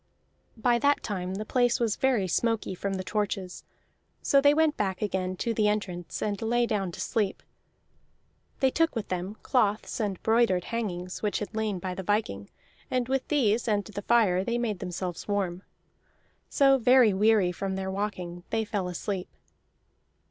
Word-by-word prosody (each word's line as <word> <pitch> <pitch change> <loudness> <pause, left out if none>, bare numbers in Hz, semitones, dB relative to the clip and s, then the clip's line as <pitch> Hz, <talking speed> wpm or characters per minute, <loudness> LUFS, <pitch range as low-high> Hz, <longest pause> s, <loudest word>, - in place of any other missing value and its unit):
By 240 +1 +2
that 285 +3 +2
time 185 -3 -3
the 215 +2 -4
place 245 0 +2
was 230 -3 +1
very 250 -8 +1
smoky 225 +1 0
from 195 +2 -3
the 185 - -3
torches, 195 -1 -3 0.6
so 275 - +4
they 285 +1 +6
went 315 0 +3
back 190 -3 -1
again 185 -3 -2
to 230 +3 -1
the 215 -1 +2
entrance 190 -5 -2
and 205 -2 -2
lay 240 +2 +2
down 200 -5 -1
to - - -9
sleep; 210 -4 -1 1.2
they 265 -1 +4
took 330 -1 +1
with 225 -3 -3
them 185 +3 -3
cloths 215 -4 +1
and 205 -4 -2
broidered 220 -5 +3
hangings 185 -6 -4
which 210 -1 0
had 210 - -5
lain 215 -3 -1
by 185 +1 -4
the 190 - -5
viking, 190 - -1 0.4
and 250 -2 0
with 270 0 0
these 240 -7 +2
and 205 -2 +1
the 205 -1 -6
fire 200 -5 +3
they 235 +3 -1
made 220 -6 -2
themselves 180 -1 -5
warm. 190 -3 -1 0.9
So, 270 -1 +4
very 245 -3 +5
weary 205 -2 +3
from 190 +1 -3
their 190 0 -3
walking, 185 -3 -4
they 225 -1 0
fell 205 -4 -2
asleep. 180 +1 -4
210 Hz, 170 wpm, -28 LUFS, 185-235 Hz, 1.2 s, they